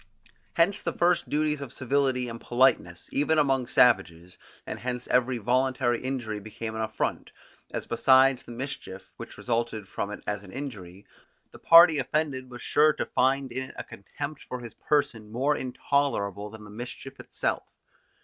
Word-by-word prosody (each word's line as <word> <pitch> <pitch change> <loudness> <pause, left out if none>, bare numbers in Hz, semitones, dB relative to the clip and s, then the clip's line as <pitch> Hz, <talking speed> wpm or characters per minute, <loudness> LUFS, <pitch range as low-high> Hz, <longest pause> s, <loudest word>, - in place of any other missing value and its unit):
Hence 170 +4 +3
the - - -2
first 175 0 +2
duties 150 -1 0
of 135 -4 -6
civility 130 -1 0
and 115 0 -7
politeness, 120 -9 +2
even 150 +3 +1
among 135 -4 +2
savages; 90 -8 +2 0.3
and - - -6
hence 125 0 -4
every 125 0 +2
voluntary 125 +1 +1
injury 120 -5 -3
became 110 +2 -6
an 110 - -3
affront, 110 -1 -2 0.4
as - - -5
besides 130 +2 +4
the - - -12
mischief, 120 -6 -7
which - - -9
resulted 115 -4 -2
from 100 - -4
it 105 - -8
as 105 -1 -2
an 95 - -12
injury, 100 -8 -7 0.5
the - - -14
party 165 -2 +8
offended 135 -1 -2
was 120 -1 -9
sure 155 +1 +4
to - - -3
find 135 0 +1
in 130 +2 -4
it - - -14
a - - -4
contempt 145 +8 -7
for 125 - -6
his 120 -2 -9
person 115 -8 -1
more 135 +6 +1
intolerable 125 -7 -1
than 110 0 -11
the 105 - -12
mischief 120 +4 -8
itself. - - -2
125 Hz, 165 wpm, -27 LUFS, 110-140 Hz, 0.5 s, party